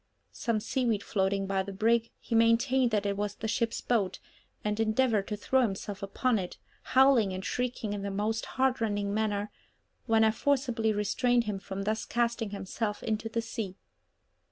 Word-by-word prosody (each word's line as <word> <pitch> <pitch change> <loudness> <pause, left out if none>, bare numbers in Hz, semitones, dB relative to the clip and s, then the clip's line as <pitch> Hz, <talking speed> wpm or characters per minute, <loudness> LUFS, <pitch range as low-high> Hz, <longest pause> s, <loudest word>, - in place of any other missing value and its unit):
Some 230 -3 -1
seaweed 225 -2 0
floating 195 -1 0
by 195 0 0
the 195 +1 -5
brig, 225 +3 +2
he - - -6
maintained 235 +3 +4
that 210 -2 0
it 200 0 0
was 205 0 -2
the 220 - -4
ship's 230 +1 -1
boat, 215 -6 0 0.5
and 210 0 -1
endeavoured 220 -2 +2
to 210 - -3
throw 260 +5 +2
himself 205 -3 -2
upon 220 +4 0
it, 180 -2 -6 0.4
howling 260 -7 +6
and 185 +1 -5
shrieking 245 -4 -2
in 205 - -4
the 200 - -3
most 210 +3 -1
heartrending 225 -6 +1
manner, 210 -1 -1 0.6
when 225 -1 +4
I 220 - +5
forcibly 245 -3 +1
restrained 240 +4 +2
him 210 -3 -3
from 195 0 -5
thus 215 +2 -1
casting 235 -2 0
himself 205 +2 -4
into 225 0 -2
the 230 +1 -2
sea. 220 -4 -5
220 Hz, 170 wpm, -29 LUFS, 200-235 Hz, 0.6 s, howling